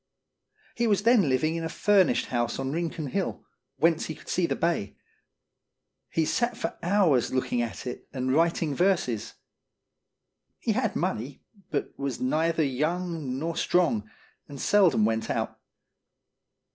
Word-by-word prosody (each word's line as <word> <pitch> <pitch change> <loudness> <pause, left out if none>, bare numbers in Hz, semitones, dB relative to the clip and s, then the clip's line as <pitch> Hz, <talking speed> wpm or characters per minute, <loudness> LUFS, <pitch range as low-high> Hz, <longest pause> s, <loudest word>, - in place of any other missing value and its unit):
He 235 0 0
was 200 -2 +2
then 230 - +5
living 155 +5 +1
in 165 - -3
a 165 - -2
furnished 200 0 +3
house 120 -1 -1
on 135 0 -2
Rincon 165 0 -3
Hill, 185 +8 -3 0.3
whence 165 0 +2
he 160 - -5
could - - -14
see 175 -2 +1
the - - -1
bay. 165 -12 -1 1.1
He 160 - +1
sat 240 +6 0
for - - -3
hours 175 - +3
looking 125 -2 0
at 115 -1 -4
it 125 - -6
and 130 -1 -1
writing 165 -1 +2
verses. 170 - 0 1.2
He - - -1
had - - 0
money, 130 +5 -3 0.3
but 145 - -2
was 140 -2 -3
neither 160 +5 +1
young 155 0 -2
nor 165 +3 -3
strong, 165 - +1 0.4
and 140 -2 -9
seldom 180 - +4
went 110 0 -1
out. - - -2
160 Hz, 145 wpm, -27 LUFS, 130-175 Hz, 1.2 s, then